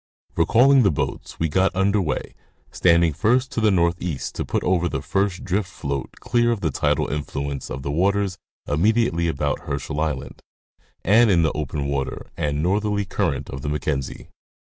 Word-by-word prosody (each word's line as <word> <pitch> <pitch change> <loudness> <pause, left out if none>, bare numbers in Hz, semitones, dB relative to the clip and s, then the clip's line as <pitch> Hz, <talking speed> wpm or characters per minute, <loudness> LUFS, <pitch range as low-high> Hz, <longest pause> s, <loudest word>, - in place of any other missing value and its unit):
Recalling 125 +10 +5
the 100 - +4
boats, 75 - -4
we 80 - +1
got 95 +4 +1
under 100 +2 +2
way, 80 - -3 0.4
standing 85 -2 +3
first 120 - +1
to 115 - -2
the 110 - +4
northeast 85 -4 0
to - - -3
put - - -2
over 90 -1 +1
our - - -1
first 95 -2 -1
drift 95 +1 -1
float 70 -5 -4
clear 120 0 +2
of 115 -4 -2
the 80 - 0
tidal - - +1
influence 70 -2 -4
of 65 +1 -5
the 70 - -2
waters 95 +3 +1 0.3
immediately 85 +2 +2
about 75 -2 -2
Her 70 - -1
schel 75 +2 -5
island, 75 -4 -3 0.6
and 110 +4 +5
in 85 -4 +4
the 80 - +2
open 75 -1 -3
water 70 -1 -3
and 75 0 -1
northerly 105 +2 0
current 80 -8 -1
of 65 - -6
the 75 - -3
Mackenzie. 70 -3 -3
85 Hz, 175 wpm, -23 LUFS, 75-100 Hz, 0.6 s, Recalling